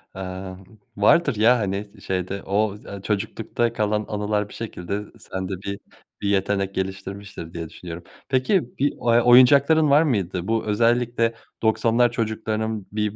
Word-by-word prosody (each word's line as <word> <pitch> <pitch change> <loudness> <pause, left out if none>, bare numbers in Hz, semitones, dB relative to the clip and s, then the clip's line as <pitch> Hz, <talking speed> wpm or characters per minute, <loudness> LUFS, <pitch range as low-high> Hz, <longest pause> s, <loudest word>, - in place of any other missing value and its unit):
Eee, 95 0 -6 0.4
vardır, 140 +5 +4
ya, 115 +4 +5
hani, 100 0 -2
sı 100 - -17
şeyde 95 +1 -3
o, 105 +2 +1
ııı, 100 -1 -8
çocuklukta 110 +3 -2
kalan 105 -1 0
anılar 105 0 -1
bir - - -12
şekilde, 100 -5 -6
ııı, 105 +1 -4
sende 95 0 -5
bir 100 +1 -5 0.4
bir 100 - 0
yetenek 100 0 0
geliştirmiştir 95 -2 -5
diye 85 -2 -5
düşünüyorum. 85 -1 -9 0.3
Peki, 130 - +1
bir, 145 +1 +2
eee, 120 0 +2
oyuncakların 140 +5 +6
var 145 +3 +6
mıydı? 95 - -1
Bu, 115 -1 0
özellikle 115 +1 +2 0.3
90'lar 115 +2 +3
çocuklarının 110 -2 -2
bir, 105 0 -1
105 Hz, 145 wpm, -23 LUFS, 95-115 Hz, 0.4 s, oyuncakların